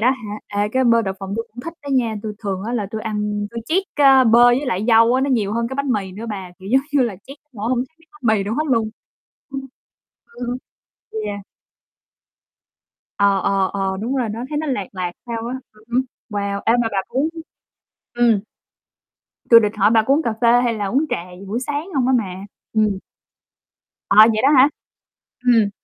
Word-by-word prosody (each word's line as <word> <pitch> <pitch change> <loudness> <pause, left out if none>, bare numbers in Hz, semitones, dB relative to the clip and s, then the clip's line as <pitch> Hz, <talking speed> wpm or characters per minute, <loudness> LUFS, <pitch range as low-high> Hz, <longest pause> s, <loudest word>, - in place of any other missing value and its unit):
đó 245 +4 +4
hả? 215 -5 -5 0.2
Ê, 205 - 0
cái 260 +4 +1
bơ 230 -1 +4
đậu 195 -2 -3
phộng 195 +1 -5
tui 230 - -2
cũng 245 - -8
thích 330 +5 -7
đó 285 - -8
nha, 235 -4 +1
tui 215 -1 -4
thường 195 -3 -3
á 235 - -3
là 220 -5 -1
tui 220 - -4
ăn 210 -1 -2
tui 235 0 -5
trét, 360 +8 +2
a, 270 -3 +6
bơ 235 +1 +6
với 245 +4 +4
lại 210 -4 -1
dâu 230 +2 +5
á 260 - +2
nó 275 - 0
nhiều 215 -5 +1
hơn 230 0 -1
cái 265 - -5
bánh 280 -1 -1
mì 195 -3 -2
nữa 215 +5 -7
bà, 190 -3 -6
kiểu 190 0 -10
giống 265 - +6
như 280 -3 +4
là 230 -6 -2
trét 275 - -10
đến 300 - -52
nỗi 220 0 -4
hông 250 -1 +1
thấy 265 +6 -5
miếng 325 0 -26
bánh 245 -8 +1
mì - - -1
đâu 210 +3 -2
hết 305 - 0
luôn. 230 -6 +1 0.6
Ưm, 275 0 -4 0.7
ừ - - -10 0.7
hứ, 220 - -3
yeah. 205 -1 -4 1.8
Ờ, 200 -1 +3
ờ, 195 -1 +1
ờ, 195 -1 -1
đúng 245 +5 -2
rồi, 245 -4 0
nó 225 +3 -5
thấy 295 - -2
nó 310 0 -2
lạt 230 -8 -1
lạt 185 -2 -3
sao 230 -1 -4
á. 250 - -3 0.2
Ừm 215 0 -22
hứm. 255 - +4 0.3
Wow, 200 -1 -2
ê, 225 - +4
mà 230 - 0
bà 195 - 0
có 260 - -2
uống 305 +3 +1 0.8
ừm. 235 -4 +3 1.1
Tui 230 -1 +10
địch 210 -2 +1
hỏi 205 +2 +4
bà 225 -1 +4
có 270 +5 +3
uống 305 - +2
cà 230 - 0
phê 240 +1 +5
hay 235 - +1
là 210 -2 -3
uống 265 +10 +1
trà - - -2 0.2
gì 195 - -10
buổi 225 +5 -2
sáng 290 +6 -4
hông 260 -3 +1
á 260 - +3
mà, 195 -6 -3 0.4
ừm. 210 -3 +1 1.1
À, 200 - +2
vậy 220 -1 +1
đó 275 - +6
hả? 265 +3 +7 0.8
Ừm. 230 -4 +4
230 Hz, 230 wpm, -20 LUFS, 205-255 Hz, 1.8 s, Tui